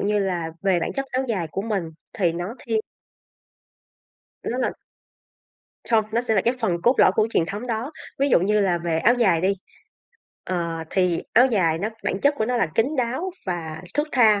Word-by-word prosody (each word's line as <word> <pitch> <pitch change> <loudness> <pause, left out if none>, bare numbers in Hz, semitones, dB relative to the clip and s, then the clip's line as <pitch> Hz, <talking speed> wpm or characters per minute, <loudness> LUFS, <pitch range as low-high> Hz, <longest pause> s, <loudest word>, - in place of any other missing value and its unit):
như 210 +1 +1
là 180 -5 -1
về 190 -3 +2
bản - - -2
chất 275 0 -3
áo 260 0 -1
dài 185 -7 -1
của 195 - -3
mình 205 -5 -1 0.3
thì 175 -5 +1
nó 175 +6 -4
thiên 225 -2 -1 1.6
Nó 245 - -3
là 255 - 0 1.2
Không, 220 -2 +4
nó 230 - +2
sẽ 240 -2 0
là 195 - +4
cái 240 +5 +1
phần 175 -6 0
cốt 245 +6 +4
lõi - - +6
của 215 +2 +2
truyền 165 - +2
thống 210 +7 -5
đó. 235 +3 -2 0.3
Ví 280 +1 +2
dụ 240 - +5
như 210 +3 +2
là 180 -3 +2
về 170 -1 -1
áo 235 +8 +4
dài 195 -9 +3
đi, 190 +3 +2 0.9
ờ, 170 -3 -2
thì 180 -3 +1
áo 245 +3 +7
dài 180 -10 +2
nó 205 - -1 0.2
bản 190 - -1
chất 285 +1 +3
của 220 - 0
nó 250 +1 0
là 235 - +2
kín 225 - +3
đáo 260 +9 -1 0.2
và 160 -3 -4
thướt 295 +1 +1
tha, 220 -5 +5
205 Hz, 205 wpm, -23 LUFS, 175-235 Hz, 1.6 s, áo